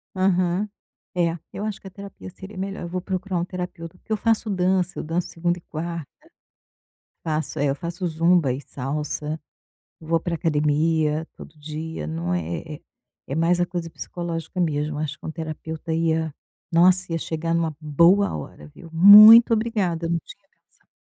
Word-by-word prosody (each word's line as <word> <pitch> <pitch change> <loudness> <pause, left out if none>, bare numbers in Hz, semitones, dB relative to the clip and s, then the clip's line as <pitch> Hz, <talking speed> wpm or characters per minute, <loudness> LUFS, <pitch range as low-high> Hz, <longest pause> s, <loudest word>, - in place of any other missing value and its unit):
Aham. 185 +1 +1 0.5
É, 170 -1 +1
eu 205 - -6
acho 215 -2 -4
que - - -12
a - - -7
terapia 200 -1 -10
seria 190 +2 -11
melhor, 195 +1 -4
eu - - -4
vou 185 +1 -3
procurar 185 0 -3
um 170 - -1
terapeuta. 180 -2 -7
Porque 220 - -16
eu - - 0
faço 225 -1 +1
dança. 185 -1 0
Eu - - -4
danço 165 +3 -2
segunda 175 +1 -1
e - - -12
quarta. 165 -1 -5 1.2
Faço, 155 -1 -2
eh, 145 - +1
eu - - 0
faço 175 +3 -5
zumba 165 -3 +2
e 130 - -4
salsa. 150 +3 -4 0.6
Vou 165 +1 0
para 170 +1 -3
academia 155 0 +1
todo 155 - -13
dia. 155 - -6
Não, 85 +3 -3
é 90 -2 -1 0.2
é 155 -2 -9
é - - -13 0.5
é 135 - -4
mais 170 +2 +2
a 175 - +3
coisa 175 -1 -5
psicológica 170 +1 -6
mesmo. 150 -2 -1
Acho 155 -1 -3
que - - -13
um 160 - -3
terapeuta 160 0 -5
ia 160 -1 0 0.4
nossa, 180 +1 +4
ia 165 - 0
chegar 165 +1 -3
numa 165 -2 0
boa 170 - +3
hora, 75 0 -9
viu. 165 - -14
Muito 210 +7 +10
obrigada, 200 -7 -1
não 170 - +1
tinha - - -14
pensado. - - -39
165 Hz, 175 wpm, -23 LUFS, 155-180 Hz, 1.2 s, Muito